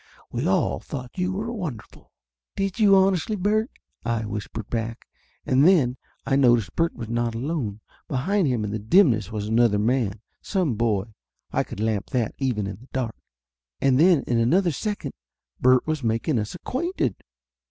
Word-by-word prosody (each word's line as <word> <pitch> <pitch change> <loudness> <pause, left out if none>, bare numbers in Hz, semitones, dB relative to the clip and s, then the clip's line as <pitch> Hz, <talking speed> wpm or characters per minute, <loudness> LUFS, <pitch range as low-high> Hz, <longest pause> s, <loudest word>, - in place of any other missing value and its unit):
We - - -1
all - - +1
thought 125 -2 -7
you 180 +1 0
were 210 +5 -3
wonderful!" 170 - -7 0.4
"Did 195 +2 -2
you, 205 -2 +6
honestly, 190 +1 +2
Bert?" 215 +4 +1 0.3
I 115 -2 -1
whispered 105 +1 -5
back. 115 -1 -4 0.4
And 130 +2 +3
then 150 -8 +4 0.3
I 135 - +1
noticed 120 -6 +3
Bert 165 0 +1
was 115 -3 -6
not 120 0 -1
alone. 120 -5 -3 0.3
Behind 175 +7 +1
him 120 -5 0
in 105 - -3
the 110 - -2
dimness 110 - +3
was 105 -1 -3
another 110 -1 +3
man 110 -2 0 0.2
some 180 - 0
boy, 110 -2 -1 0.4
I - - +1
could - - -9
lamp 110 -2 -1
that, 120 -5 -1
even 125 -7 0
in 95 -1 -5
the 125 +5 -17
dark! 125 -4 -2 0.6
And 135 -1 +3
then 170 -3 +5
in 120 -1 0
another 170 +10 +3
second 210 - -4 0.5
Bert 130 0 +4
was 155 -3 -2
making 115 +4 0
us 105 +7 -4
acquainted. 260 - -2
125 Hz, 165 wpm, -24 LUFS, 110-175 Hz, 0.6 s, you